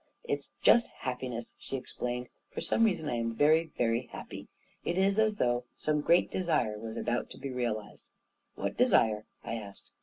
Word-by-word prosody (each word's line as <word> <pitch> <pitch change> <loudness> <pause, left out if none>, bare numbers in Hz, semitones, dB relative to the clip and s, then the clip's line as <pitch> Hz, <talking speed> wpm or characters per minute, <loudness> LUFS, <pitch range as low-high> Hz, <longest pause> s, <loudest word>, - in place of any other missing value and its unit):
" - - -46
It 475 - -1
is - - -17
just 235 - +7
happiness," 125 -2 -4
she 135 - -4
explained. 125 -1 -4
" - - -48
For - - -6
some 230 - +2
reason, 180 -8 +1
I 120 - 0
am 115 0 -2
very, 155 +5 +5
very 115 -1 +1
happy. - - -8 0.4
It 175 - -1
is 195 +2 +3
as 215 -1 +3
though 120 -7 +1
some 150 -1 0
great 170 +4 +4
desire 125 - 0
was 110 0 -6
about 120 - -1
to - - -10
be 135 0 -5
realized." 115 -4 -3 0.5
"What - - -3
desire? 110 -1 +4 0.2
"I - - -4
asked. 100 -3 -10
125 Hz, 190 wpm, -31 LUFS, 115-165 Hz, 0.5 s, just